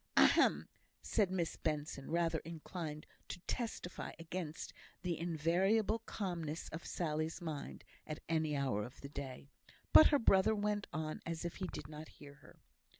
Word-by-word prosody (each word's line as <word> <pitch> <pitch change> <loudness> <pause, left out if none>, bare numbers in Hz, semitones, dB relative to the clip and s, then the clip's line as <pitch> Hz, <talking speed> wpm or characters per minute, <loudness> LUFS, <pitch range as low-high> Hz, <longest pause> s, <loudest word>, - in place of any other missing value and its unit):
"Ahem!" - - +6 0.4
said 205 -4 +2
Miss 180 -3 -1
Benson, 150 -3 -2
rather 165 -1 +2
inclined 160 -1 -6 0.2
to - - -5
"testify" 220 -4 -3
against 165 -1 -5 0.3
the 175 -2 0
invariable 180 +7 +2
calmness 170 -6 -3
of 165 +2 -6
Sally's 155 -1 -1
mind 155 -5 -5 0.2
at 155 - -4
any 155 -2 +1
hour 130 -7 +1
of 120 +5 -9
the 140 - -7
day; 140 -1 -6 0.5
but - - +11
her 290 - +5
brother 220 -3 +5
went 205 0 0
on 155 0 -3
as 165 +1 -3
if 170 - -3
he 185 - -2
did 145 - -6
not 155 +1 -8
hear 145 -1 -12
her. - - -16
165 Hz, 150 wpm, -37 LUFS, 150-185 Hz, 0.5 s, but